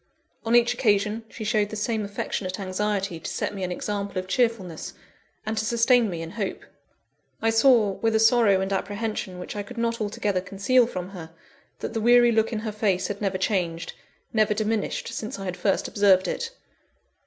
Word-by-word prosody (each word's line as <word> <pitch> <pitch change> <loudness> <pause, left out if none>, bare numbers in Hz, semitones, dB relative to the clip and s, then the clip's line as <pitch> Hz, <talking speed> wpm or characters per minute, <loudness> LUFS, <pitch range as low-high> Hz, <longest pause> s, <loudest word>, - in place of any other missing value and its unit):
On 230 - +3
each 240 0 +5
occasion, 220 -2 +1
she 225 - -8
showed 210 -1 +1
the 215 - -6
same 220 0 -1
affectionate 200 -1 -4
anxiety 195 -1 -2
to - - -6
set - - -2
me 195 -2 -5
an 180 - -2
example 200 +1 -3
of 185 0 -3
cheerfulness, 205 -7 -1 0.5
and 220 +1 -2
to - - -1
sustain 235 0 +3
me 170 -3 -4
in 165 - -7
hope. 200 -2 -4 0.8
I 225 - +2
saw, 225 -3 +5
with 225 +3 0
a - - +4
sorrow 225 -4 +5
and 190 +1 -1
apprehension 205 -1 -3
which 180 - -7
I 205 - -2
could 240 +4 -10
not 230 0 -1
altogether 205 -2 -1
conceal 200 +6 +2
from 180 -5 -5
her, 175 -5 -9 0.5
that - - -4
the 225 - -1
weary 240 +1 +6
look 225 0 +2
in 220 -2 -2
her 220 -1 -3
face 200 -3 0
had 205 0 -5
never 195 -2 0
changed, 175 -4 -1 0.4
never 215 -1 +3
diminished 215 0 -1
since 220 +1 -5
I 195 - -6
had 180 -1 -3
first 190 +2 0
observed 195 -3 +4
it. - - -2
210 Hz, 190 wpm, -25 LUFS, 190-225 Hz, 0.8 s, weary